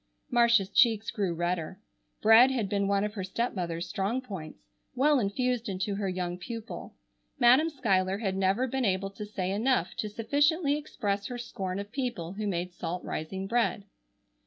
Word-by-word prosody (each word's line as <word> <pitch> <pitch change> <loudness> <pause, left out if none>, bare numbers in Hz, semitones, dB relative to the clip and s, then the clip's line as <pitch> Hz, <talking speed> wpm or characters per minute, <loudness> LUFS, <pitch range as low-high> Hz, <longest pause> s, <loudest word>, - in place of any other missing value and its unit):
Marcia's 235 -5 +4
cheeks 225 -3 +3
grew 200 -4 -1
redder. 175 -1 -2 0.4
Bread 225 +4 +8
had 245 -6 -1
been 200 0 0
one 200 0 +2
of 210 0 -2
her 195 -4 -4
stepmother's 185 -4 -2
strong 200 +6 -1
points, 190 - -8 0.3
well 285 +2 +4
infused 245 +2 -1
into 195 +1 -2
her 200 -1 -2
young 180 -1 -3
pupil. 230 +3 -7 0.4
Madam 255 +7 +5
Schuyler 195 - +1
had 195 -3 -2
never 195 +6 +2
been 260 +1 -2
able 195 -2 0
to 210 +1 -7
say 190 -3 -3
enough 215 -2 +1
to 215 - -2
sufficiently 285 - +2
express 205 -9 -3
her 245 - -5
scorn 195 -6 -4
of 200 +1 -6
people 235 -10 -3
who 210 +1 -3
made 180 -2 -2
salt 175 +1 -4
rising 190 +5 -4
bread. 230 -1 0
205 Hz, 165 wpm, -29 LUFS, 190-240 Hz, 0.4 s, Bread